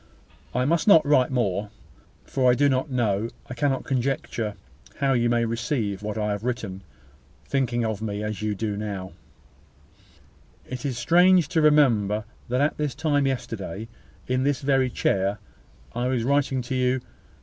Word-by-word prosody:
"I 125 +1 +2
must 165 +7 +1
not 165 -7 +7
write 135 -4 +4
more; 105 -5 -1 0.6
for 130 -2 +2
I 125 - +5
do 145 +3 +3
not 130 +1 0
know, 115 -4 0 0.2
I - - -7
cannot 135 +1 0
conjecture, 130 -4 -2 0.4
how 135 -1 +1
you 120 -1 +2
may 120 0 +2
receive 115 -3 -2
what 105 0 -4
I 105 -1 0
have 105 +1 -3
written, 110 -6 -3 0.6
thinking 120 -4 0
of 110 -2 -3
me 105 -1 -3
as 105 -1 -4
you 105 -1 -1 0.2
now 100 -3 -4
do. - - -19 1.6
It 130 - -3
seems 135 -4 -3
strange 175 +6 +4
to 160 - +2
remember 115 -9 +3 0.2
that 125 +2 +1
at 145 - +1
this 150 -4 -2
time 145 -3 +1
yesterday, 115 -5 -4 0.4
in 130 0 0
this 140 +2 0
very 135 -2 +2
chair, 100 -3 0 0.6
I 120 +1 -1
was 125 -3 0
writing 135 -1 +1
to 120 - -5
you. 130 0 +1
125 Hz, 160 wpm, -25 LUFS, 110-135 Hz, 1.6 s, not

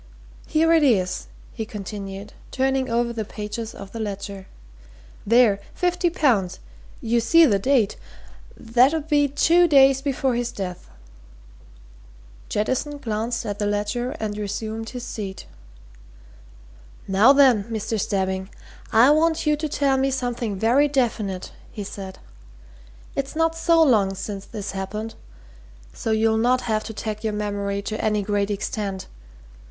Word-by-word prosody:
Here 325 +1 +3
it 325 - +5
is," 200 -10 +1 0.3
he 225 - -4
continued, 200 -1 -7 0.2
turning 265 0 0
over 235 0 0
the 225 -2 -3
pages 215 +2 -6
of 200 -1 -10
the 230 - -7
ledger. 200 -2 -5 0.8
"There! 230 -3 +5 0.2
50 355 0 +1
pounds. 235 - +1 0.4
You 235 +1 +1
see 330 +8 +6
the 205 -8 +2
date 235 -2 +2 0.6
that 245 +6 +3
'ud 315 -1 -3
be 290 -2 +3
two 335 +5 +4
days 270 -3 +5
before 270 -2 0
his 240 0 -1
death." 180 -3 -6 1.6
Jettison 260 +7 -1
glanced 230 -1 -3
at 205 -1 -4
the 205 - 0
ledger 210 +6 -2
and 210 -1 -3
resumed 220 +2 -4
his 250 -1 -7
seat. 200 -6 -6 1.6
"Now, 200 +7 +6
then, 260 -7 +5
Mr. 220 -1 -3
Stebbing, 190 -1 -1 0.4
I 240 +5 +6
want 320 +2 +2
you 300 0 +3
to 305 +1 -4
tell 275 -2 +1
me 270 +1 +1
something 245 -5 -2
very 245 +8 +3
definite," 225 -9 -1 0.2
he 210 - -6
said. 195 -1 -8 1.0
"It's 275 +2 -3
not 325 0 +1
so 330 0 +4
long 205 -9 +3
since 200 0 -6
this 210 -3 -6
happened, 210 +3 -5 0.8
so - - -5
you'll 220 0 +2
not 250 +2 +2
have 215 -2 -1
to - - -5
tag 215 0 -5
your 220 -1 -1
memory 200 -1 -2
to 215 +1 -4
any 210 -1 +1
great 205 0 0
extent. 200 -1 -3
225 Hz, 140 wpm, -23 LUFS, 205-270 Hz, 1.6 s, see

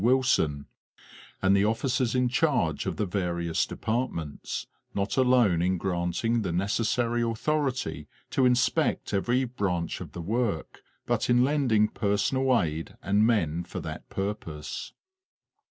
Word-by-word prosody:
Wilson, 115 - +2 0.8
and 95 +1 +5
the 100 - +4
offi 115 +5 0
cers 125 -1 +1
in 125 0 +3
charge 125 - +1
of - - -1
the 105 - -1
various 85 -3 -1
departments, 110 - -3 0.3
not 100 0 -1
alone 125 -9 +4
in 90 +1 +1
granting 90 +6 0
the 95 -5 -2
necessary 115 +6 0
authority 130 +4 -1 0.2
to 130 - +2
inspect 125 0 +1
every 120 +6 +2
branch 100 -9 -2
of - - -8
the 85 - -5
work, 110 -4 -2 0.2
but - - 0
in 120 0 +5
lending 130 -7 +3
personal 120 +6 +1
aid 80 0 -3
and 105 +3 +3
men 85 -8 +1
for - - -6
that - - -7
purpose. 95 -7 -4
105 Hz, 135 wpm, -27 LUFS, 90-125 Hz, 0.8 s, and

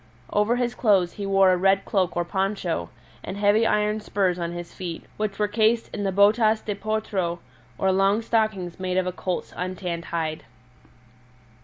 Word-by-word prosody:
Over 210 +3 +2
his 245 -1 -1
clothes 195 -8 +3
he 200 -1 -5
wore 195 -1 +5
a 180 - +3
red 195 +2 +3
cloak 185 -4 0
or 175 - +1
poncho, 190 -2 -2 0.3
and 190 - -6
heavy 205 +2 +3
iron 210 0 +1
spurs 195 -4 0
on 170 0 -2
his 175 0 -7
feet, 175 -3 -6
which 210 -2 -2
were 210 - +1
cased 220 +2 +1
in 205 - -3
the 195 - +1
botas 215 +3 +4
de 210 - -3
potro, 200 -4 -2 0.4
or 190 - +2
long 195 +4 +2
stockings 215 -7 -1
made 185 0 -1
of 185 - +2
a 180 - -1
colt's 180 0 -4
untanned 180 -2 -4
hide. 160 -2 -3
195 Hz, 175 wpm, -24 LUFS, 180-210 Hz, 0.4 s, wore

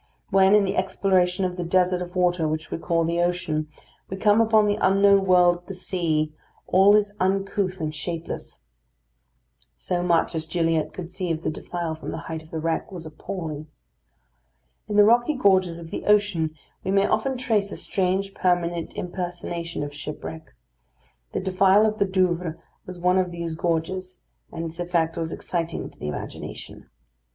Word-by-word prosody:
When, 195 +1 +6
in 210 - +5
the 195 +1 -1
exploration 185 -1 +1
of 180 0 -3
the 175 - -2
desert 180 +1 +2
of 180 +1 -7
water 175 -3 +2
which 155 0 -3
we - - -3
call 165 0 +1
the 170 +1 0
ocean, 175 -3 -1 0.4
we 190 - -4
come 210 +2 +4
upon 220 -1 +4
the 205 0 +1
unknown 195 +1 +5
world 180 -1 +5
of 175 - -21
the 195 - -5
sea, 160 -5 -1 0.3
all 195 +3 +6
is 205 -1 +2
uncouth 190 0 0
and 155 -1 -2
shapeless. 165 +2 -6 1.2
So 180 -1 -1
much 175 -1 +2
as 160 -1 -3
Gilliatt 165 -1 0
could 180 -1 -8
see 185 -1 -3
of 165 0 -2
the - - 0
defile 170 0 -4
from 160 - -7
the - - -4
height 160 -1 -5
of 160 - -17
the 160 - -5
wreck, 165 +3 -2
was 175 -3 -7
appalling. 155 -1 -6 1.2
In 210 - -3
the 205 - +8
rocky 240 +6 +4
gorges 190 -7 +3
of 165 -1 -10
the - - -5
ocean 200 -7 +2 0.3
we - - -3
may 195 +1 +3
often 265 +4 0
trace 215 -5 0
a - - -5
strange 195 +1 -1
permanent 175 -2 0
impersonation 175 -2 -4
of 145 0 -6
shipwreck. 150 +2 -8 0.8
The - - -1
defile 190 +2 +4
of 215 0 -1
the 200 - +4
Douvres 180 -3 0 0.3
was 180 -1 -7
one 180 +1 +3
of 185 -1 0
these 170 -1 -4
gorges, 180 +3 -2 0.3
and 165 0 -4
its 165 +1 -5
effect 170 -2 0
was 165 -1 -3
exciting 170 -1 -3
to - - -18
the 75 - -5
imagination. 75 - -7
180 Hz, 175 wpm, -24 LUFS, 165-195 Hz, 1.2 s, the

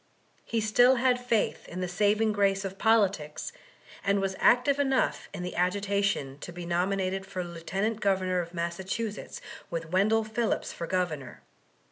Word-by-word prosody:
He 230 - -1
still 245 +4 +5
had 250 0 +2
faith 230 -3 0
in 175 - -6
the 180 - -1
saving 210 +4 +2
grace 200 -1 +1
of 195 0 -6
politics, 195 -9 +1 0.5
and 200 0 +2
was 195 -1 -1
active 260 +4 +4
enough 270 -2 +1
in 180 - -6
the 180 - -5
agitation 200 -6 0
to 175 - -7
be 175 0 -7
nominated 185 +2 0
for 190 -1 -4
Lieut 190 +6 -2
Governor 185 -3 +1
of 170 -1 -4
Massachusetts 190 +5 -4 0.3
with 165 -1 -4
Wendell 215 +4 +3
Phillips 220 +1 -1
for 170 - -5
Governor. 160 -9 -2
195 Hz, 150 wpm, -28 LUFS, 180-220 Hz, 0.5 s, still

